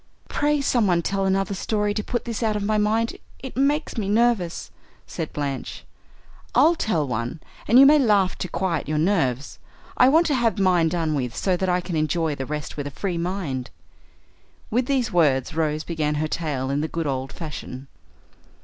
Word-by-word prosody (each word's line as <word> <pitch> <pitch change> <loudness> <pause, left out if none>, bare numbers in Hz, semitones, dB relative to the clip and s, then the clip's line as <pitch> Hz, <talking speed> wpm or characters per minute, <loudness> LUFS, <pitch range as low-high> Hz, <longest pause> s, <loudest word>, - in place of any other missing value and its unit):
"Pray 295 0 +1
someone 205 -11 +2
tell 195 +2 -1
another 195 +1 0
story 210 +1 -1
to 215 0 -2
put 240 +2 -3
this 230 -2 -4
out 220 -2 +1
of 205 - -2
my 215 +1 +1
mind; 220 +2 +1 0.2
it 265 -1 -9
makes 280 -1 0
me 200 -2 -2
nervous," 215 -6 +1 0.3
said 165 -3 -5
Blanche. 140 -2 -4 0.7
"I'll 330 - +6
tell 175 - -1
one, 120 +4 -3 0.3
and 235 - +5
you 270 - +9
may 300 +2 +7
laugh 205 -7 +3
to - - -3
quiet 175 -5 -2
your 155 - 0
nerves. 150 -7 0 0.4
I 255 - +6
want 325 +5 +4
to 300 - +1
have 235 -5 +1
mine 180 -4 +3
done 165 -2 -1
with, 125 -4 -2
so 185 -2 +1
that 185 +1 -1
I 180 0 +2
can 175 -1 -5
enjoy 155 0 0
the 135 -2 -5
rest 150 0 -5
with 145 -1 -3
a - - -4
free 175 +4 -3
mind." 165 -9 -3 1.0
With 245 +3 +1
these 260 -6 0
words 145 -7 +2
Rose 155 -1 -1
began 155 -3 -2
her 155 +1 -1
tale 140 -5 -2
in 140 +1 0
the 155 - -1
good 165 0 -3
old 135 -1 -2
fashion. 145 -5 -7
180 Hz, 190 wpm, -23 LUFS, 150-220 Hz, 1.0 s, you